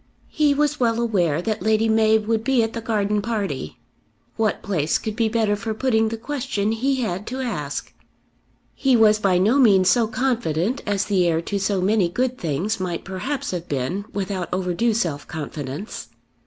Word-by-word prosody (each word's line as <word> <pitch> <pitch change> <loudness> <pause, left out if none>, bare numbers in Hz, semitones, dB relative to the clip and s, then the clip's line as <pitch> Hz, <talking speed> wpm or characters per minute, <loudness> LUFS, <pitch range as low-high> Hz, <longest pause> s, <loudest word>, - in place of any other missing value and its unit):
He 295 -3 +3
was 295 +1 +1
well 230 -2 +2
aware 175 -9 +1
that 215 +1 -2
Lady 220 +1 +2
Mab 220 -1 +3
would 225 0 0
be 250 -1 +3
at 225 - -3
the 230 - -4
garden 210 -2 0
party. 195 - -3 0.6
What 220 -2 0
place 160 -6 0
could 215 -1 -5
be 225 -1 +1
better 220 -2 +1
for 220 +1 -4
putting 220 -2 +2
the 225 - -4
question 225 -5 -2
he 260 +4 0
had 195 -2 -3
to 260 +2 -4
ask? 150 - -4 0.8
He 265 -2 +2
was 215 -1 +5
by 195 -3 +2
no 215 +10 +3
means 195 -7 +5
so 235 -3 +3
confident 240 - -1
as 200 -2 0
the 185 -4 +2
heir 165 -1 +2
to 200 +3 -2
so 195 -1 0
many 195 -2 +2
good 250 +6 -1
things 175 +8 -1
might 180 -2 -3
perhaps 260 +9 -3
have 175 -2 -4
been 145 +9 -2
without 190 -3 -3
overdue 185 +5 0
self 160 -10 -2
confidence. 150 - -6
215 Hz, 180 wpm, -22 LUFS, 185-230 Hz, 0.8 s, was